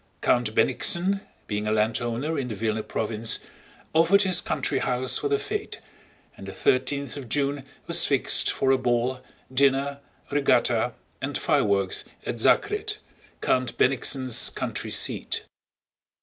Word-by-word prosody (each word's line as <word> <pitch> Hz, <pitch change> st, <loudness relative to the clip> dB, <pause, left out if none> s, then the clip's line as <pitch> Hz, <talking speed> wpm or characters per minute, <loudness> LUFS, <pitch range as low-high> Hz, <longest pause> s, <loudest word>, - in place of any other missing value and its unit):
Count 120 Hz, -3 st, +1 dB
Bennigsen, 185 Hz, -, +2 dB, 0.2 s
being 105 Hz, 0 st, -3 dB
a -, -, +1 dB
landowner 115 Hz, +7 st, 0 dB
in 135 Hz, -4 st, -2 dB
the 110 Hz, -, -5 dB
Vílna 110 Hz, +1 st, -2 dB
province, 110 Hz, 0 st, 0 dB, 0.6 s
offered 170 Hz, +5 st, +5 dB
his 185 Hz, -2 st, +1 dB
country 135 Hz, -, -1 dB
house 125 Hz, 0 st, 0 dB
for -, -, -1 dB
the 420 Hz, -, +2 dB
fete, 420 Hz, 0 st, -5 dB, 0.6 s
and -, -, -11 dB
the -, -, -5 dB
thirteenth 140 Hz, -, 0 dB
of 130 Hz, -5 st, -8 dB
June 140 Hz, 0 st, -1 dB, 0.2 s
was -, -, +3 dB
fixed -, -, +2 dB
for 135 Hz, -, +1 dB
a 135 Hz, -, +3 dB
ball, 125 Hz, +1 st, 0 dB, 0.3 s
dinner, 140 Hz, +1 st, +2 dB, 0.3 s
regatta, 145 Hz, -1 st, +2 dB, 0.3 s
and -, -, -2 dB
fireworks 100 Hz, -2 st, +1 dB, 0.2 s
at 115 Hz, -, -4 dB
Zakret, 420 Hz, -, +2 dB, 0.4 s
Count 130 Hz, -2 st, 0 dB
Bennigsen's 130 Hz, -1 st, +2 dB
country -, -, -4 dB
seat. -, -, -1 dB
130 Hz, 135 wpm, -25 LUFS, 115-155 Hz, 0.6 s, offered